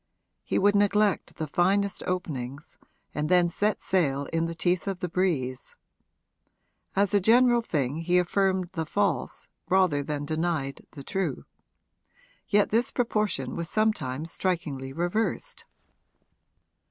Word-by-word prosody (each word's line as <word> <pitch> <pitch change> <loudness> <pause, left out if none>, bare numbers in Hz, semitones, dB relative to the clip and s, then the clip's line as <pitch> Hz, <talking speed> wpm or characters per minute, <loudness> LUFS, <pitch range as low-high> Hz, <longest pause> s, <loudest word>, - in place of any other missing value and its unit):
He - - -1
would 205 +1 +4
neglect 205 0 +2
the 160 - -3
finest 195 +6 +1
openings 140 -6 -4 0.3
and 150 +1 -2
then 180 -1 +4
set 205 +4 0
sail 145 -7 0
in 165 0 +1
the 165 - -5
teeth 175 0 0
of 195 -2 -1
the 180 -1 -3
breeze. 155 -9 -1 1.2
As 200 +1 +2
a 205 - +4
general 240 +3 +5
thing 145 - -1
he 175 +2 +1
affirmed 185 0 +1
the 160 -4 -3
false 190 -8 -1 0.2
rather 180 -6 +3
than 145 0 -3
denied 155 -3 -2
the 140 - -9
true; 190 +5 -3 1.0
yet 205 -1 +3
this 230 +3 +2
proportion 210 - -1
was 170 0 -3
sometimes 165 -9 0
strikingly 150 -9 -2
reversed. 195 - -2
175 Hz, 130 wpm, -27 LUFS, 150-200 Hz, 1.2 s, general